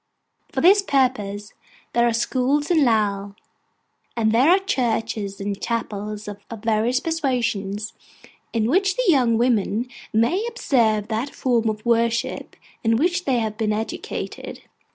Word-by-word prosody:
For - - -1
this 395 +4 +6
purpose 220 - 0 0.4
there 240 0 +3
are - - +2
schools 260 +6 0
in 320 -4 +4
Lowell; 205 -4 +1 0.8
and 220 -1 +2
there 250 +7 +4
are 365 - +7
churches 225 - -2
and 200 0 -4
chapels 210 -2 -4
of 205 -1 -7 0.2
various 225 +3 +1
persuasions, 230 -9 -2 0.6
in 225 -2 0
which 380 +7 +2
the - - 0
young 250 -7 +4
women 235 -1 +1 0.2
may 235 - +2
observe 230 - +1
that 230 +6 -3
form 235 -3 +1
of 215 +1 -5
worship 235 0 0 0.3
in 225 0 +3
which 355 +7 +1
they 265 -3 +2
have 220 -1 -2
been 215 -1 +1
educated. 220 +1 -5
230 Hz, 135 wpm, -22 LUFS, 215-265 Hz, 0.8 s, are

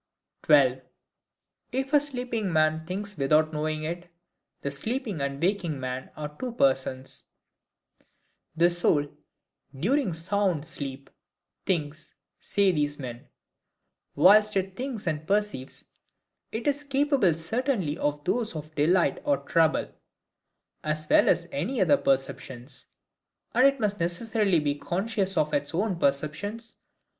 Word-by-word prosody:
12. 130 -4 +5 0.9
If 265 +3 -2
a 295 - +6
sleeping 245 -8 -3
Man 155 0 +2
thinks 200 +3 -5
without 155 +3 +3
knowing 155 0 -2
it, 175 +2 -5 0.5
the 140 - -2
sleeping 215 - -3
and 140 0 -2
waking 175 -5 0
Man 130 0 -4
are 150 -1 -6
two 250 -2 -4
Persons. 130 - 0 1.3
The 170 +2 +4
soul, 150 -4 +1 0.6
during 245 - +1
sound 180 -1 0
sleep, 140 -4 -6 0.6
thinks, 155 -4 -2 0.2
say 200 -2 +2
these 145 -3 0
men. 125 0 -8 0.9
Whilst 210 +6 +6
it 190 0 -2
thinks 250 -3 -5
and 155 -2 -2
perceives, 205 -10 -1 0.7
it 225 - -4
is 290 0 0
capable 275 - +2
certainly 190 - -1
of 145 0 -1
those 225 +1 -1
of 155 0 -7
delight 170 +4 +2
or 290 -1 +2
trouble, 165 -2 +2 0.9
as 155 0 -2
well - - +6
as 170 - +2
any 200 - -2
other 160 -7 +5
perceptions; 135 -1 -3 0.7
and 250 +3 +6
IT 275 0 +1
must 205 -1 -1
necessarily 195 +2 +1
be 145 -1 0
CONSCIOUS 195 +6 -2
of 150 0 +1
its 145 +2 -1
own 190 -1 0
perceptions. 165 - -2
170 Hz, 125 wpm, -27 LUFS, 145-210 Hz, 1.3 s, a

